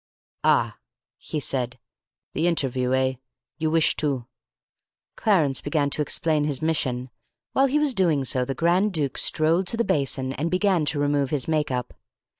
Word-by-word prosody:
"Ah," - - +2 0.4
he 155 - -4
said, 125 -3 -2 0.6
"the 160 +4 +1
interviewer, 130 -6 +1
eh? 130 0 +1 0.5
You 160 0 0
wish 160 0 +3
to 135 -6 -1 0.5
" - - -62
Clarence 160 - +2
began 145 -1 0
to 150 - 0
explain 150 0 +1
his 145 -3 -2
mission. 130 -6 -1 0.4
While 270 +1 +4
he 275 +3 +1
was 300 -3 +2
doing 170 - +2
so 130 0 +1
the 135 +2 -3
Grand 180 +5 +2
Duke 145 -5 -1
strolled 165 +4 +2
to 230 - 0
the 235 - +2
basin 135 -2 0
and 150 +5 -2
began 185 -2 +2
to 150 0 -1
remove 145 -1 +1
his 145 -3 -1
make 155 -2 0
up. 125 -2 -3
150 Hz, 170 wpm, -24 LUFS, 135-170 Hz, 0.6 s, While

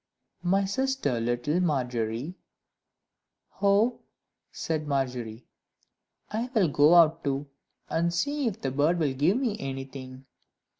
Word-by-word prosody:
"My 195 +2 +2
sister, 260 - -1
little 120 +8 0
Margery," 125 -3 -1 1.3
"Oh!" 205 +4 +3 0.5
said 155 -2 -3
Margery, 125 -5 -2 0.9
"I 230 +4 -2
will 190 -7 +4
go 145 +4 +5
out 165 -1 +5
too, 140 0 -1 0.4
and 170 +1 0
see 285 +10 -1
if 215 - -3
the 135 - -2
bird 150 +6 +2
will 150 -5 0
give 155 - +2
me 240 -6 -1
anything." 135 -2 -7
150 Hz, 115 wpm, -27 LUFS, 130-195 Hz, 1.3 s, go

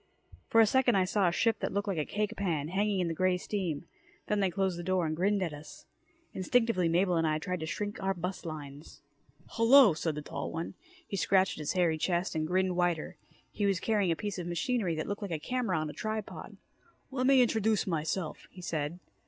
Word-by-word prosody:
For 225 - +3
a 225 - +8
second 245 +1 +3
I 190 -1 +3
saw 195 0 +2
a - - +3
ship 225 +4 +1
that - - -2
looked 200 +1 -2
like 190 -5 -1
a 150 - 0
cake 210 0 -2
pan, 160 -7 -1
hanging 200 +1 +1
in 175 - 0
the 165 - -1
grey 185 +2 +2
steam. 180 -6 -3 0.4
Then 210 - 0
they 195 -2 +2
closed 185 0 -1
the - - -5
door 185 -1 +1
and 155 0 -1
grinned 195 +3 +1
at 165 -4 -3
us. 145 +1 -11 0.5
Instinctively, 190 -2 +2
Mabel 180 +1 +2
and 165 -1 +2
I 155 0 +1
tried 180 +3 -3
to 160 - -4
shrink 205 +5 -4
our 195 0 0
bust 180 +2 -4
lines. 150 -3 -8 0.5
"Hello," 230 -2 +6
said 160 0 -2
the 150 - -5
tall - - -5
one. 165 +1 -4 0.3
He 200 - -4
scratched 190 -1 +2
at - - -5
his 150 - -2
hairy 170 -4 +2
chest 175 +2 0
and 155 -1 -1
grinned 185 +1 +1
wider. 175 -3 0 0.3
He 205 - 0
was 195 -3 +1
carrying 205 -3 +1
a - - +1
piece 205 +1 -4
of 175 - -4
machinery 175 +1 0
that 155 - -3
looked 205 +2 -4
like 200 - -4
a 165 - -1
camera 235 +1 -1
on 155 0 -1
a 150 - -6
tripod. 215 -1 -5 0.5
"Lemme 260 0 +1
introduce 220 -3 +2
myself," 160 0 -3
he 180 - -12
said. 155 -1 -2
185 Hz, 220 wpm, -30 LUFS, 165-205 Hz, 0.5 s, a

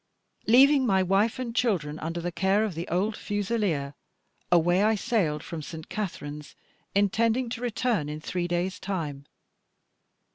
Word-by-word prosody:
Leaving 270 +4 +6
my 190 -6 +3
wife 195 +6 +2
and 240 -2 -4
children 160 -12 0
under 165 +2 -3
the 175 +1 -3
care 190 +4 +2
of 215 -4 -2
the 165 +2 -5
old 195 +6 0
fusileer, 205 -10 -1 0.6
away 175 +2 +4
I 220 +1 +3
sailed 190 - 0
from 165 -2 -6
St. 160 +1 -9
Katharine's, 150 -8 -5 0.4
intending 225 +5 +2
to 230 0 -5
return 235 - 0
in 150 +1 -5
three 175 +2 -3
days' 175 +2 -1
time. 155 -8 -4
190 Hz, 145 wpm, -27 LUFS, 165-220 Hz, 0.6 s, Leaving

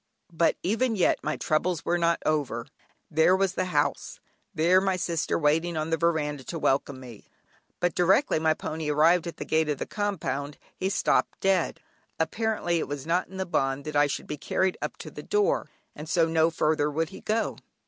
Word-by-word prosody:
But 165 0 +2
even 225 +4 +1
yet 185 - +2
my 150 +1 -2
troubles 165 +1 0
were 175 - +1
not 170 0 +1
over. 140 -6 -1 0.5
There 160 +4 +4
was 195 0 +1
the 185 - -1
house, 180 - -1 0.3
there 180 +1 +4
my 190 -1 +1
sister 170 -2 -1
waiting 165 +3 +1
in 155 +1 -2
the - - +4
veranda 150 -4 0
to 170 - -5
welcome 140 -2 0
me, 120 -5 -12 0.5
but 175 -1 +1
directly 190 - +3
my 160 0 +2
pony 155 -1 -4
arrived 165 +4 +4
at 170 - -6
the - - -5
gate 160 -1 +1
of 145 - 0
the - - -4
compound 150 -9 -3 0.2
he 190 - -1
stopped - - +1
dead. 190 -3 +1 0.4
Apparently 175 -1 0
it - - -3
was 145 -1 -5
not 170 +3 0
in 190 - -10
the 190 - -2
bond 135 -5 -1
that 155 -1 -5
I 145 0 +5
should 140 - -4
be 150 - -5
carried 190 +5 0
up - - -4
to - - -9
the - - -8
door, 420 +4 +1 0.3
and 155 +1 -8
so 170 -2 +3
no 160 0 +3
further 155 -2 +1
would 160 +2 -1
he - - -11
go. 220 +1 -1
165 Hz, 200 wpm, -27 LUFS, 150-185 Hz, 0.5 s, I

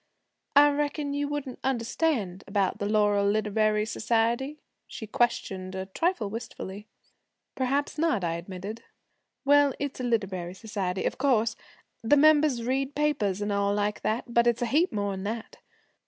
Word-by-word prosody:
'I 290 +1 +8
reckon 290 0 -1
you 285 0 -1
wouldn't 285 -3 -4
understand 230 - -1
about 200 0 0
the 205 - -1
Laurel 205 -1 +3
Literary 215 0 +1
Society?' 235 +6 0 0.3
she 220 - -7
questioned 190 -4 -1
a 190 0 -3
trifle 240 - -1
wistfully. 210 -2 -7 0.7
'Perhaps 275 +3 -1
not,' 315 - +1
I 165 -1 0
admitted. 185 +6 -6 0.6
'Well, 285 -1 +5
it's 285 -1 -4
a - - -3
literary 190 -7 -1
society, 190 -3 -3
of - - -2
course. 235 -5 +2 0.5
The 230 +6 +4
members 295 -4 +4
read 265 +3 -1
papers, 240 -10 0
and 205 - -2
all 200 0 +1
like 210 0 -1
that, 220 +3 0
but 235 0 +4
it's 240 0 +2
a 240 - -2
heap 335 +5 +3
more'n 200 -2 -2
that. 220 +2 -5
225 Hz, 150 wpm, -27 LUFS, 200-280 Hz, 0.7 s, I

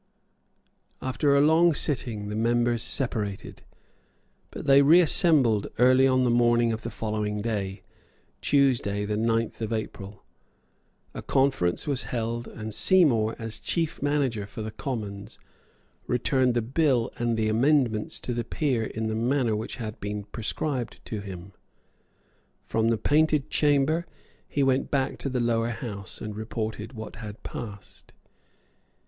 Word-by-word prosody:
After 140 +2 +1
a 140 - +5
long 160 +2 +4
sitting 120 -8 +1
the 105 - -4
members 120 +1 +1
separated; 110 -8 -1 0.9
but - - -8
they 140 0 +6
reassembled 150 - +4
early 130 +2 +5
on 130 -1 +2
the 125 - +2
morning 120 -1 +3
of 110 - -5
the 115 - -5
following 105 -2 -3
day, 100 -3 -3 0.6
Tuesday 120 -8 +2
the 105 0 -2
ninth 115 +1 -1
of 110 0 -3
April. 100 -2 -5 0.9
A - - -6
conference 130 -10 +1
was 140 -3 -2
held; 115 0 -3
and 110 -1 -7
Seymour, 120 - +4
as 115 -1 -3
chief 165 -2 -1
manager 135 -8 0
for 110 +2 -7
the 110 - -5
Commons, 105 -5 -6 0.7
returned 125 0 +1
the 120 - +1
bill 130 -1 +1
and 120 -1 0
the 110 -1 +1
amendments 115 -1 +1
to 125 - -3
the 120 0 -2
Peers 120 -2 -1
in 110 0 -2
the 110 - -1
manner 120 0 +1
which 110 +1 -5
had 110 -4 -6
been 105 +1 -4
prescribed 120 +4 -3
to 110 - -5
him. 95 -1 -9 1.1
From 110 0 0
the 115 0 +2
Painted 150 +2 +1
Chamber 150 +3 +2 0.4
he 140 - 0
went 135 0 +1
back 135 -1 -1
to 140 - -2
the 130 -1 -1
Lower 115 -1 +1
House, 105 -5 -6
and 105 -1 -5
reported 110 +1 -5
what 110 -2 -8
had 105 -1 -9
passed. 100 -4 -9
115 Hz, 140 wpm, -26 LUFS, 110-135 Hz, 1.1 s, they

